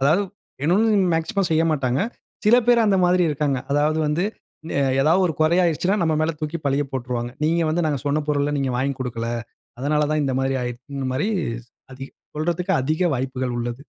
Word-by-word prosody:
அதாவது 155 +9 +3 0.4
வேணும்னு 190 +10 +3 0.2
மேக்ஸிமம் 190 +3 0
செய்யமாட்டாங்க. 155 -5 +1 0.4
சில 220 +4 +6
பேர் 235 -2 +5
அந்த 195 -2 +3
மாதிரி 180 0 +3
இருக்கிறாங்க. 145 -2 0
அதாவது 150 +2 +2
வந்து 155 +5 0 0.8
ஏதாவு 160 +7 +4
ஒரு 165 - -1
கொறையாடுச்சுன்னா? 175 +3 +2
நம்ம 160 -1 +2
மேல 155 +1 +2
தூக்கி 155 +2 -3
பழிய 140 +1 +2
போட்டுருவாங்க. 120 -2 -3
நீங்க 165 +2 +2
வந்து 170 +1 0
நாங்க 145 -2 0
சொன்ன 150 +2 +1
பொருள 145 0 +1
நீங்க 135 -1 0
வாங்கி 135 +2 0
குடுக்கல. 115 -2 -3 0.5
அதனால 150 +3 +1
தான் 155 -1 +1
இந்த 135 - 0
மாதிரி 135 0 0
ஆடுச்சுன்ற 130 +3 -5
மாரி 150 +11 0 1.1
சொல்றதுக்கு 170 +3 -1
அதிக 155 +7 0
வாய்ப்புகள் 130 -1 -2
உள்ளது. 120 +2 -4
150 Hz, 160 wpm, -22 LUFS, 135-170 Hz, 1.1 s, சில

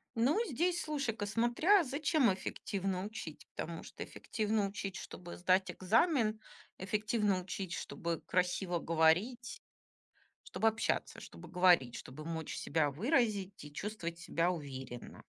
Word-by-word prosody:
Ну, 265 - +3
здесь 345 +5 +1
слушай-ка, 275 -9 -2
смотря 240 - +4
зачем 285 - +2
эффективно 190 0 -3
учить, 215 +2 -7
потому - - -4
что - - -7
эффективно 215 -2 -1
учить, 195 -1 -5
чтобы 175 -2 -8
сдать 185 +1 +3
экзамен, 220 - +2 0.4
эффективно 210 -1 +1
учить, 185 -1 -5
чтобы 170 -1 -3
красиво 180 0 +1
говорить. 165 +9 +3 1.2
Чтобы 225 - +2
общаться, 225 +1 0
чтобы - - -11
говорить, 175 -9 +4
чтобы 145 +4 -8
мочь 160 -1 -4
себя 150 -1 +1
выразить 205 - +1
и 145 - -11
чувствовать 170 -2 -4
себя 170 +1 +1
уверенно. 135 -7 -7
195 Hz, 120 wpm, -34 LUFS, 170-230 Hz, 1.2 s, смотря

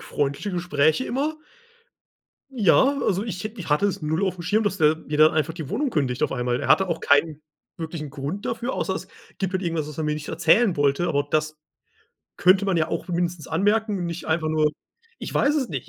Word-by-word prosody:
freundliche 145 +8 -2
Gespräche 170 - +1
immer 290 +6 -2 1.1
ja, 235 -7 +3 0.3
also 195 +1 0
ich 190 -5 -5
hätt 215 +1 -7
ich 180 - -7
hatte 150 +7 +3
es 195 - -3
0 160 +4 -1
aufm 185 -2 -3
Schirm, 210 +6 +1
dass 205 -2 -1
der 155 -1 +4
mir 150 -2 -5
dann 155 +1 +6
einfach 155 0 0
die 160 -5 -7
Wohnung 285 -2 -1
kündigt 135 - -1
auf - - +1
einmal. 125 -1 -1
Er - - -4
hatte 190 - +5
auch 165 -1 -2
keinen 150 +1 +2 0.3
wirklichen 160 -2 -6
Grund 150 +7 -5
dafür, 235 +3 -2
außer - - -2
es - - -6 0.3
gibt 190 -1 -2
halt 190 0 -1
irgendwas, 165 -4 -2
was 150 - -10
er 160 - -1
mir 150 0 0
nicht 150 0 -7
erzählen 195 +1 +3
wollte, 145 +4 +1
aber 145 -2 0
das 155 0 -1 0.8
könnte 185 +2 +4
man 190 -3 +1
ja 155 - +1
auch - - -4
mindestens 175 -2 -2
anmerken 205 +4 +1
und 175 - -3
nicht 170 0 -6
einfach 160 0 0
nur 155 -1 +2 0.5
ich - - -6
weiß 285 +1 +2
es 275 -5 0
nicht 135 -6 -5
165 Hz, 215 wpm, -24 LUFS, 150-195 Hz, 1.1 s, dann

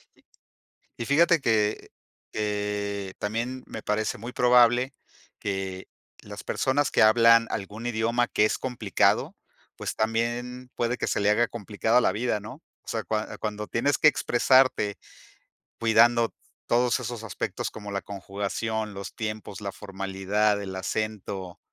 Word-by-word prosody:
Y - - -28 0.7
y 115 - -4
fíjate 165 +5 +4
que 110 -3 +1 0.4
que 105 -2 -2
también 120 +5 -3
me 110 - -7
parece 105 +1 -1
muy 120 +3 -6
probable, 125 +1 +4 0.5
que 95 -2 -4 0.3
las - - -9
personas 140 +1 0
que - - +3
hablan 115 +1 +6
algún 105 +4 -5
idioma 115 +1 +1
que 105 - +2
es - - 0
complicado, 115 -6 +1 0.4
pues, - - -4
también, 120 +3 -2
puede 120 +1 0
que - - -1
se - - 0
le 100 - +3
haga 115 +3 +3
complicado 110 +2 +1
la 95 - +3
vida, 110 +1 -1
¿no? 120 +10 -10 0.2
O - - -34
sea, 110 -1 -2
cuan 105 +3 -3
cuando 105 0 -3
tienes 145 +5 +1
que 150 - +7
expresarte 125 -6 +3 0.8
cuidando 115 +1 +4 0.4
todos 120 +1 +2
esos 120 -2 -5
aspectos 100 - -3
como 105 -1 -8
la 100 -1 -3
conjugación, 100 +2 -4
los 100 -1 -7
tiempos, 110 -2 -5
la 100 -1 -4
formalidad, 100 +1 -1
el 95 -1 -6
acento, 95 -2 -4
110 Hz, 140 wpm, -26 LUFS, 100-120 Hz, 0.8 s, que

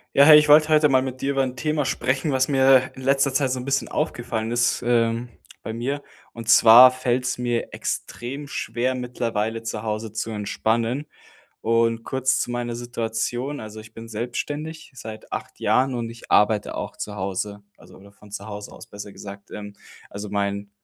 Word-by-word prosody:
Ja, 140 - +8
hey, 150 -1 +10
ich 150 -1 +3
wollte 155 +1 +7
heute 155 -1 +4
mal 130 -1 +5
mit 130 -1 -5
dir 135 - 0
über 135 -1 +1
'n 130 -1 -3
Thema 150 +1 -1
sprechen, 135 +3 0
was 130 0 +2
mir 130 -2 +4
in - - -11
letzter 135 +1 +2
Zeit 135 0 +1
so 130 - -1
'n 125 - -6
bisschen 140 0 0
aufgefallen 120 -7 -2
ist, 120 0 +1
ähm, 120 0 +1 0.3
bei 110 - -5
mir. 135 +5 -3 0.3
Und 115 -1 -3
zwar 120 +3 +9
fällt's 125 0 -1
mir 120 -1 -2
extrem 135 +5 -5
schwer, 130 -2 -2
mittlerweile 115 -3 -2
zu 115 -2 -4
Hause 110 -1 -4
zu 110 +1 -3
entspannen. 115 +5 -1 0.6
Und 115 0 +1
kurz 130 0 0
zu - - -2
meiner 120 -1 -3
Situation: 120 +3 -3
Also, 110 0 -8
ich 110 +1 -15
bin 115 0 -9
selbstständig 145 +8 -5
seit 110 -3 -10
8 - - -6
Jahren 130 +1 +2
und 115 -1 -3
ich 115 0 -13
arbeite 105 0 +3
auch - - -5
zu 105 - -5
Hause, 100 +2 -4 0.2
also - - -16
oder 100 +1 -16
von 105 +1 -18
zu 100 0 -7
Hause 105 -1 -8
aus, - - -12
besser 100 -1 -9
gesagt. 100 0 -11
Ähm, 105 -1 -8 0.4
also 105 +1 -6
mein 100 0 -2
120 Hz, 185 wpm, -23 LUFS, 110-130 Hz, 0.6 s, hey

